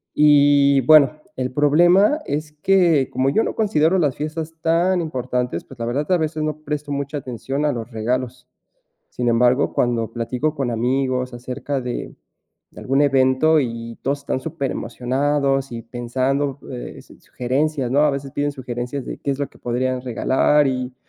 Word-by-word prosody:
Y 145 -2 +5
bueno, 155 -3 +7 0.2
el 130 0 -3
problema 175 - +4
es 150 +1 -3
que, 165 -3 +3
como 130 +1 +1
yo 220 - +2
no - - -2
considero 190 -4 +2
las 145 -5 +1
fiestas 155 +2 -5
tan 175 +2 +2
importantes, 125 -4 -3
pues 135 - -14
la 115 - -2
verdad, 145 +8 -2
a 180 - +5
veces 155 -1 -2
no 155 0 -3
presto 150 0 -4
mucha 140 +1 -3
atención 135 +2 -4
a 150 - +2
los 120 +1 -6
regalos. 125 +3 -3 0.6
Sin 120 -1 -2
embargo, 125 +4 +3
cuando 115 -2 0
platico 125 +6 -2
con 135 -4 -2
amigos 125 +1 -1
acerca 130 +3 -4
de 125 -1 -5 0.6
de - - -11
algún 135 +2 +1
evento 135 +3 +3
y 115 -2 -5
todos 140 +1 -1
están 140 - -2
superemocionados 135 0 -1
y 115 -1 -6
pensando, 130 +4 -2
eh, 125 - -8
su - - -18
sugerencias, 135 +1 -2
no, 140 +2 +3
a 150 -1 +4
veces 140 0 -5
piden 145 0 -1
sugerencias 125 0 -5
de - - -6
qué 140 - -2
es 135 - -6
lo 140 - -1
que - - -21
podrían 125 +1 -1
regalar. 135 +4 +2
Y 125 -1 -3
135 Hz, 170 wpm, -21 LUFS, 125-150 Hz, 0.6 s, bueno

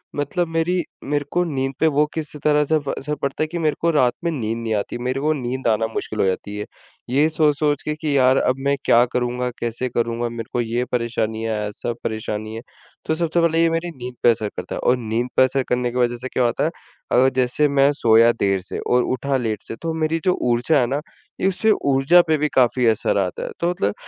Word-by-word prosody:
मतलब 145 +5 -1
मेरी 165 +2 0 0.2
मेरे 145 0 -1
को 175 0 +2
नींद 135 -4 -2
पे 160 - +4
वो 150 0 +3
किस 155 -2 -5
तरह 150 0 +3
से 155 - +1
व 145 -2 -3
असर 150 +2 -3
पड़ता 140 +2 -2
है - - -1
कि 170 +3 -5
मेरे 155 -3 +1
को 170 - +2
रात 130 -6 +3
में 170 - 0
नींद 115 -6 -2
नहीं 115 -1 -2
आती, 105 +3 -3
मेरे 125 +2 -2
को 155 +2 +1
नींद 130 -2 -3
आना 110 0 +2
मुश्किल 110 -1 -5
हो - - +3
जाती 95 +2 -2
है। 105 - -4 0.4
ये 140 +5 +3
सोच-सोच 150 -2 +1
के 150 - -2
कि 150 -2 -1
यार 130 0 +4
अब 130 - +2
मैं 140 0 +3
क्या 120 - +6
करूँगा? 125 0 -1
कैसे 120 +2 -2
करूँगा? 120 0 -1
मेरे 115 -1 -7
को 120 - +1
ये 120 +2 -1
परेशानीयाँ 115 -2 -1
है, 105 - -2
ऐसा 110 +3 -4
परेशानी 110 0 -4
है। 115 - -6 0.4
तो 160 - 0
सबसे 170 +1 0
पहले 165 0 +2
ये 165 - +4
मेरी 165 +1 -2
नींद 125 0 -7
पे - - +7
असर 105 -2 -2
करता - - -5
है - - -4
और 125 - +3
नींद 115 +1 -2
पे - - +7
असर 130 +1 +1
करने 125 0 0
की 125 - -5
वजह 120 -1 +1
से 125 +2 -6
क्या 130 -1 0
होता 120 0 +1
है 160 - 0 0.4
अगर 130 +2 +5
जैसे 130 +4 +2
मैं 140 0 +4
सोया 115 -3 +5
देर 95 -1 +1
से 95 - -6
और 125 - +4
उठा 140 +2 -1
लेट 110 -4 -2
से - - -7
तो 165 -1 -2
मेरी 160 0 0
जो 185 - +4 0.2
ऊर्जा 125 +6 +2
है 120 - +2
न 145 - 0 0.5
इससे 195 +3 +2
ऊर्जा 140 +6 +5
पे 155 -1 +3
भी 150 - +1
काफ़ी 125 -1 +3
असर 110 -2 +1
आता 95 -3 -1
है। - - -4
तो 170 - +1
मतलब 105 - -1
130 Hz, 240 wpm, -21 LUFS, 115-150 Hz, 0.5 s, पे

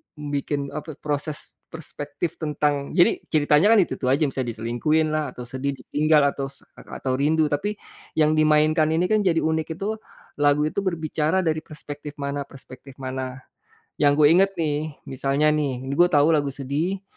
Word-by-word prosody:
bikin, 145 -1 -3
apa, 150 0 -6
proses 150 0 -4
perspektif 160 0 -6
tentang 150 -2 -1
jadi 175 -1 +4
ceritanya 150 +3 +3
kan - - +6
itu-itu 135 - -4
aja, 135 +5 +3
misal 135 -3 -1
diselingkuhin 120 +8 0
lah 155 -3 -1
atau 125 - -7
sedih 130 +3 -3
ditinggal 150 +3 +2
atau 135 -1 -4
s 135 - -14
lak - - -16 0.2
atau 130 0 0
rindu 155 +1 +2
tapi, 205 +9 -1 0.4
yang 155 -1 +3
dimainkan 155 0 +3
ini 180 +5 +1
kan 215 - +4
jadi 170 -4 +2
unik 160 0 -1
itu, 215 +4 -3 0.4
lagu 145 0 +3
itu 155 +6 -1
berbicara 165 -1 0
dari 160 -2 0
perspektif 150 -1 -9
mana-perspektif 140 -2 -7
mana. 130 -1 -5 0.6
Yang 145 -1 +4
gue - - +8
inget 190 +4 +5
nih, 155 -2 -2 0.2
misalnya 140 +3 +1
nih 135 -4 -2
gue 175 +6 +4
tahu 150 -2 +4
lagu 145 -4 +1
sedih, 155 +9 -2
150 Hz, 160 wpm, -24 LUFS, 140-160 Hz, 0.6 s, gue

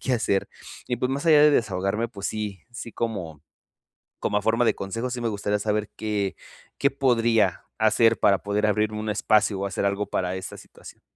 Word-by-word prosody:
qué 130 - 0
hacer 100 -4 0 0.4
y 125 - -1
pues, 125 +2 -1
más 140 +5 -3
allá 150 -2 +7
de 150 - +7
desahogarme. 105 -3 0
Pues 100 -2 -6
sí 105 -4 -4
sí, 120 -1 -8
como 90 -10 -4 0.8
como 105 - 0
a - - 0
forma 115 +2 +2
de - - +2
consejo. 115 +6 -4
Sí, 120 -1 -4
me 115 - 0
gustaría 105 0 -1
saber, 105 0 -1
¿qué 105 -3 -2 0.4
qué 140 - +2
podría 115 -7 +2
hacer, 115 0 +4
para 100 - +4
poder 105 +1 0
abrir 105 0 +1
un 105 0 -3
espacio, 105 -1 +2
o - - -1
hacer 100 +1 -2
algo 100 +1 0
para 90 0 -2
esta 95 - -6
situación? - - -14
105 Hz, 195 wpm, -25 LUFS, 100-115 Hz, 0.8 s, allá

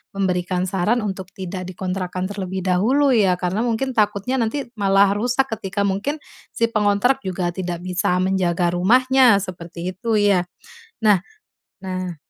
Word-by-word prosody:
memberikan 180 -1 0
saran 195 +5 0
untuk 190 -2 -4
tidak 185 -1 -6
dikontrakkan 185 0 -4
terlebih 190 -1 -4
dahulu 235 +10 +2
ya? 195 -6 +3
Karena 180 +3 -2
mungkin 240 +3 -1
takutnya 215 +2 0
nanti 230 +5 -1 0.2
malah 195 0 +4
rusak 245 +6 +1 0.2
ketika 200 0 -2
mungkin, 200 +10 -1 0.4
si 230 0 +1
pengontrak 210 +5 +2
juga 185 -6 -2
tidak 175 -1 -5
bisa 180 0 0
menjaga 180 -2 +1
rumahnya, 245 +3 +4
seperti 175 -1 -6
itu 225 +5 -3
ya? 195 -4 +2 0.6
Nah 210 -3 +5 0.7
nah. 185 -2 -4
195 Hz, 135 wpm, -21 LUFS, 180-220 Hz, 0.7 s, Nah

